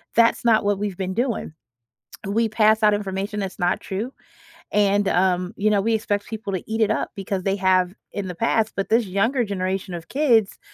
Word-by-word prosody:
That's 230 0 +4
not 220 -3 +4
what 205 -1 +1
we've 205 -3 -3
been 190 -1 -3
doing. 235 - -2 0.8
We 225 +3 +1
pass 220 0 +3
out 210 0 +5
information 200 +1 -3
that's 190 -2 -5
not 175 -2 +1
true, 215 +7 -4 0.6
and, 205 -1 +3
um, 180 +1 +1
you 215 +1 +2
know, 210 -1 +3
we 230 +2 +1
expect 205 -1 -1
people 215 -3 -5
to 185 - -2
eat 225 +1 -1
it 215 - +3
up - - -1
because 195 -1 -3
they 195 +1 +1
have 185 -1 +2 0.2
in 200 -2 -4
the 180 - -6
past, 225 +1 +1
but 195 - -2
this 230 +1 +3
younger 225 +6 +1
generation 190 -1 -3
of 165 - -9
kids, 240 -8 +2
205 Hz, 200 wpm, -23 LUFS, 190-220 Hz, 0.8 s, out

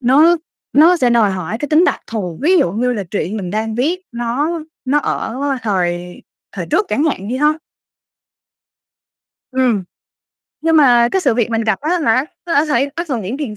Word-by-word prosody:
nó 295 +7 +5 0.4
nó 330 +5 +6
sẽ 250 -6 +2
đòi 225 -4 +3
hỏi 185 +4 -4
cái 290 - -4
tính 315 +4 +4
đặc - - 0
thù, 185 -7 -5
ví 365 +4 +4
dụ 175 - +1
như 250 +4 0
là 205 -4 -3
truyện 205 0 -2
mình 185 -4 -4
đang 220 +2 -2
viết 315 +10 0
nó 265 +8 -2 0.2
nó 280 +3 +2
ở 235 - -3 0.3
thời 180 -4 -2 0.3
thời - - -5
trước 425 - +1
chẳng 290 - 0
hạn 210 -10 -2
đi 250 - -2
ha. 300 +3 +3 2.0
Ừm. 250 -6 +1 0.8
Nhưng 325 0 +2
mà 245 -5 +5
cái 380 - +2
sự 265 -9 +2
việc 235 -1 0
mình 225 0 0
gặp 215 -3 0
á 305 - -2
là 360 - +2
nó 255 -1 +2 0.2
nó 335 - -1
đã 290 +3 +3
xảy 280 0 +1
nó 340 - -2
thường 260 -9 -3
những 205 +8 -4
tiền 230 -8 -5
245 Hz, 200 wpm, -17 LUFS, 215-300 Hz, 2.0 s, nó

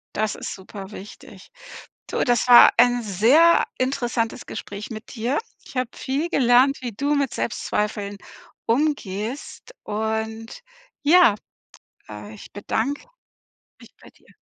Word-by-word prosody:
Das 215 -1 -1
ist - - -6
super 195 +1 -10
wichtig. 205 0 -12 0.6
Du, - - -1
das 245 0 +1
war 240 - +9
ein 245 0 +4
sehr 235 - +4
interessantes 240 -3 -2
Gespräch 200 +3 -7
mit 220 0 -9
dir. 245 +5 -1 0.3
Ich - - -14
habe 255 -1 -1
viel 280 +6 -2
gelernt, 260 -1 +4
wie 240 -2 -4
du 285 +7 -1
mit 280 -4 0
Selbstzweifeln 210 -2 -3 0.5
umgehst 245 - -2
und 220 - -4 0.4
ja, 300 - +5 0.7
äh, 105 0 -9
ich - - -13
bedanke 245 - -3 0.7
mich - - -17
bei - - -15
dir. - - -28
235 Hz, 125 wpm, -23 LUFS, 210-275 Hz, 0.7 s, war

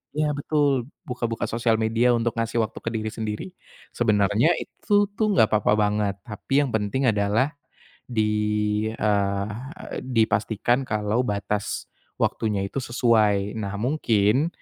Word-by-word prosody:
ya 150 0 +1
betul, 145 -4 +1 0.2
buka-buka 120 -2 -3
sosial 115 0 +1
media 115 +2 +3
untuk 115 -1 0
ngasih 115 0 0
waktu 110 - -6
ke - - -3
diri 110 -1 -2
sendiri. 110 - -4 0.5
Sebenernya 105 - +3
itu 205 -2 +1
tuh 220 - +2
enggak 110 - +4
papa 105 - +2
banget. 105 -1 +1
Tapi 135 +5 0
yang 135 - -3
penting 110 +5 -1
adalah 105 +6 +1 0.6
di, 105 -1 0
eee, 100 -1 0 0.5
dipastikan 115 +1 +1
kalau 105 +2 0
batas 105 -1 -2 0.4
waktunya 105 -3 0
itu 135 - -4
sesuai. 110 -4 +2
Nah 100 -1 -4
mungkin 120 -1 +2
110 Hz, 125 wpm, -24 LUFS, 105-120 Hz, 0.6 s, enggak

